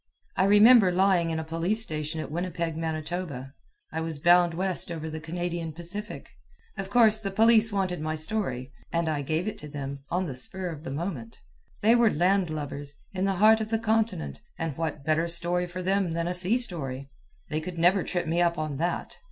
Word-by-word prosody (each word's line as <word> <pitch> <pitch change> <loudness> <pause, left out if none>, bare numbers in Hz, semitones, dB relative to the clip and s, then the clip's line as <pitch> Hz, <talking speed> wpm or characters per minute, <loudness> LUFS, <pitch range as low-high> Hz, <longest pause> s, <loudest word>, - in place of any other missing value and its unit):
I 190 - +3
remember 210 0 +7
lying 180 -2 +3
in 160 -1 -1
a - - -3
police 165 +7 0
station 155 -3 -4
at - - -7
Winnipeg, 170 -1 -2
Manitoba. 155 -4 -4 0.4
I 160 - -3
was 160 -2 -4
bound 175 +2 +4
west 185 -1 -2
over 160 -1 -5
the 160 - -5
Canadian 170 0 -4
Pacific. 175 +6 -6 0.5
Of 195 -2 -5
course, 220 -1 +5
the 200 -2 -3
police 225 +2 +4
wanted 185 -4 -1
my 155 0 -2
story, 155 - -2 0.2
and 170 0 0
I 155 -2 0
gave 155 +7 -1
it 215 0 -4
to 150 - -8
them 140 -1 -5
on 180 +2 0
the 145 - -4
spur 180 +9 -4
of 155 -1 -9
the - - -4
moment. 135 -6 -5 0.4
They 225 +2 +6
were 235 -2 +5
landlubbers, 155 -6 -1 0.2
in 190 0 -1
the 195 - +1
heart 220 +3 +5
of 215 - -3
the 225 - +1
continent, 220 -5 -1 0.2
and 165 -4 -3
what 155 -3 -4
better 160 +2 +2
story 175 +1 -1
for 180 +1 -6
them 190 -2 +1
than 170 +1 -1
a 180 - -1
sea 185 +6 +1
story? 140 - -4 0.4
They 155 +1 -1
could 175 +2 -6
never 180 +3 +4
trip 175 - -2
me 165 +2 +1
up 170 -1 +2
on 155 -3 -3
that. 170 +4 -3
175 Hz, 200 wpm, -27 LUFS, 155-195 Hz, 0.5 s, remember